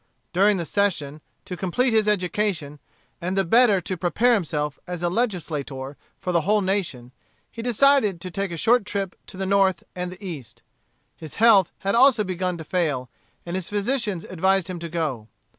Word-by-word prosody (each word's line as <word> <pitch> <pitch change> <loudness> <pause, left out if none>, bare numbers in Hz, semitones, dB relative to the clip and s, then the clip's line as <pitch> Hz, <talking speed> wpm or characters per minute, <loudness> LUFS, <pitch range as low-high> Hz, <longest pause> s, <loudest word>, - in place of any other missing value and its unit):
During 200 +3 +4
the 170 - -3
session, 155 -7 -1 0.2
to 180 - -5
complete 225 +8 0
his 215 -1 +3
education, 180 -6 -1 0.4
and 180 +3 -2
the 195 - +3
better 220 +1 +5
to 185 - -3
prepare 205 +8 +2
himself 150 -7 -1
as 175 -1 -5
a 175 - +2
legislator 150 - -3 0.2
for 180 - -3
the 170 -2 +2
whole 210 +5 +2
nation, 175 -11 -2 0.4
he 230 - -7
decided 245 -5 +3
to 185 - -6
take 195 0 -3
a 170 - -5
short 235 +6 +3
trip 195 -3 -3
to - - -11
the 190 - -2
North 190 -2 +2
and 180 0 -4
the 185 +2 -11
East. 120 -9 -9 0.5
His 155 -2 -10
health 215 -5 +5
had 195 +1 0
also 245 -2 +5
begun 185 -2 -2
to 160 - -7
fail, 150 -8 -1 0.3
and 175 +1 -4
his 185 -2 -3
physicians 210 -3 -1
advised 190 +1 +1
him 175 - -6
to 170 0 -6
go. 150 -10 -3
185 Hz, 180 wpm, -24 LUFS, 165-205 Hz, 0.5 s, better